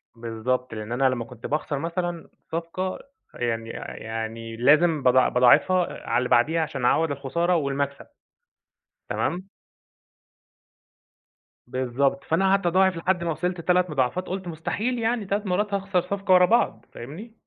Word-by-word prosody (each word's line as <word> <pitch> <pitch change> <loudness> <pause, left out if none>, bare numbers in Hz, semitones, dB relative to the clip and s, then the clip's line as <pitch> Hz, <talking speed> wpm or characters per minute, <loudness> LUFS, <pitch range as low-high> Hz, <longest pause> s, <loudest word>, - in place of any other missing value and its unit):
بالضبط، 120 +2 -3
لأن 110 0 -6
أنا 130 +2 +3
لمّا 120 -2 -2
كنت 115 -1 -12
باخسر 150 -1 -2
مثلًا 170 +1 -3 0.2
صفقة 170 +3 -3 0.3
يعني 115 -2 -2 0.3
يعني 115 0 -5
لازم 150 +5 +4
باضاع 130 0 +5
باضاعفها 150 +9 +3
على - - +2
اللي 125 0 0
بعديها 160 +8 +3
عشان 140 -5 -3
أعوّض 160 +4 +3
الخسارة 170 +6 0
والمكسب، 140 -2 -2 1.0
تمام. 185 +2 -2 2.2
بالضبط، 130 +2 0
فأنا 165 +4 +1
قعدت 195 -1 +2
أضاعف 185 +1 +3
لحد 175 +1 0
ما 170 - -1
وصلت 175 +3 -2
3 180 +1 +2
مضاعفات، 150 +5 -1
قُلت: 185 0 -4
"مستحيل 210 +9 -2
يعني 230 -1 0
3 200 +2 -2
مرات 200 +2 0
هاخسر 195 -2 0
صفقة 195 +1 0
ورا 180 0 +7
بعض." 235 +6 +1
فاهمني؟ 165 - -9
165 Hz, 135 wpm, -25 LUFS, 125-185 Hz, 2.2 s, ورا